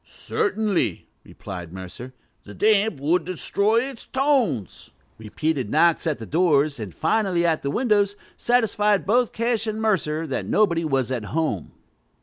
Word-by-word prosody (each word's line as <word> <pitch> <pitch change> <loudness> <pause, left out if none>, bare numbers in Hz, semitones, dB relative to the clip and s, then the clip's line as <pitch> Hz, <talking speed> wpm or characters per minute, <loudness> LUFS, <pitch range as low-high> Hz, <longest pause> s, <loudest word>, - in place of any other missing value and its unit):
"Certainly," 220 - -2
replied 90 -4 -9
Mercer: 95 +7 -9 0.3
"the 105 - -12
damp 215 -5 +2
would 160 +5 +1
destroy 200 +5 0
its 265 -2 -8
tones." 260 - 0 0.3
Repeated 130 +3 -2
knocks 165 +4 +3
at 155 - 0
the 115 - -8
doors, 150 -2 +2
and 105 -4 -6
finally 175 - 0
at 165 -2 +1
the 140 - -2
windows, 205 - +1 0.2
satisfied 210 -5 +1
both 240 +4 +2
Cash 230 -1 -1
and 215 0 -3
Mercer 165 -8 0
that 140 - -3
nobody 170 -6 +2
was 135 -5 0
at 120 -5 -3
home. 150 - -2
170 Hz, 140 wpm, -23 LUFS, 140-220 Hz, 0.3 s, knocks